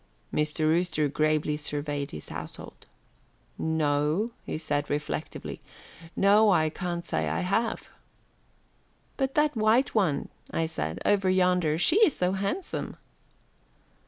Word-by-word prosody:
Mr. 150 +1 0
Rooster 155 -1 +2
gravely 155 +1 +1
surveyed 145 -1 -3
his 75 - -9
household. - - -8 0.7
"No," 155 +5 +1 0.2
he - - -2
said 145 -2 -2
reflectively, 150 +1 -4 0.5
"no, 205 +2 +5
I 155 -5 +3
can't 175 -1 -4
say - - -1
that - - -1
I - - -1
have." 200 +6 -1 1.3
"But 270 -1 -1
that 300 -1 +3
white 225 +4 +3
one," 185 -10 +1 0.2
I 165 - 0
said, 80 - -4
"over 200 -2 +3
yonder. 180 -4 +2
She 315 - +3
is 430 - +5
so 180 0 +1
handsome." 200 - -3
170 Hz, 125 wpm, -27 LUFS, 150-205 Hz, 1.3 s, no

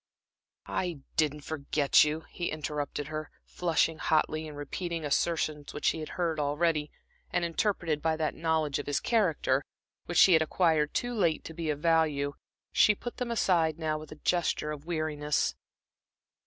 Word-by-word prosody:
"I 175 -6 -3
didn't 150 -1 +1
forget 145 -1 +3
you," 150 +1 -1
he 175 +1 -5
interrupted 150 -1 -3
her, 155 0 -4 0.2
flushing 165 -2 0
hotly, 155 0 +1
and 150 -1 -9
repeating 165 +3 -4
assertions 150 -1 -1
which 150 - -5
she - - +2
had 155 - -6
heard 165 -3 0
already, 150 +1 +1 0.4
and 175 - 0
interpreted 170 -3 0
by 160 0 +1
that 155 -1 0
knowledge 160 -3 0
of 145 - -6
his 145 - +1
character, 165 - +1 0.4
which 175 - -2
she 185 - +8
had 160 - +6
acquired 160 -2 +2
too 245 0 -1
late 170 -8 +1
to 165 - -8
be 165 -1 -3
of 145 -1 -2
value. 155 -4 +2 0.4
She 210 - +5
put 240 +4 -7
them 250 -1 -3
aside 170 -8 +2
now 155 -2 -1
with 155 - -11
a - - -7
gesture 170 -3 +1
of 150 +1 -8
weariness. 155 -3 0
155 Hz, 165 wpm, -29 LUFS, 150-170 Hz, 0.4 s, she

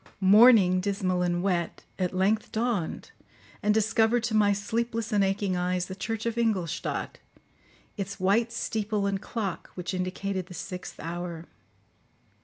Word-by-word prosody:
Morning, 200 -2 +7
dismal 185 -2 0
and 175 0 0
wet, 175 -4 -1 0.2
at 180 -1 0
length 200 +4 +1
dawned 220 -7 -2 0.5
and 210 - +2
discovered 220 +2 +2
to 235 - -1
my 210 -1 +4
sleepless 225 +3 -2
and 205 -2 +3
aching 195 -1 0
eyes 180 0 0
the 190 - -7
church 225 +2 -4
of 230 0 -1
Ingolstadt, 200 -9 -1 0.8
its 200 0 -5
white 215 +5 +2
steeple 215 -3 -2
and 195 -1 -1
clock, 205 -7 -4
which 180 +1 -4
indicated 185 0 -3
the 180 - -10
sixth 180 0 -7
hour. 170 0 -5
200 Hz, 140 wpm, -27 LUFS, 185-220 Hz, 0.8 s, Morning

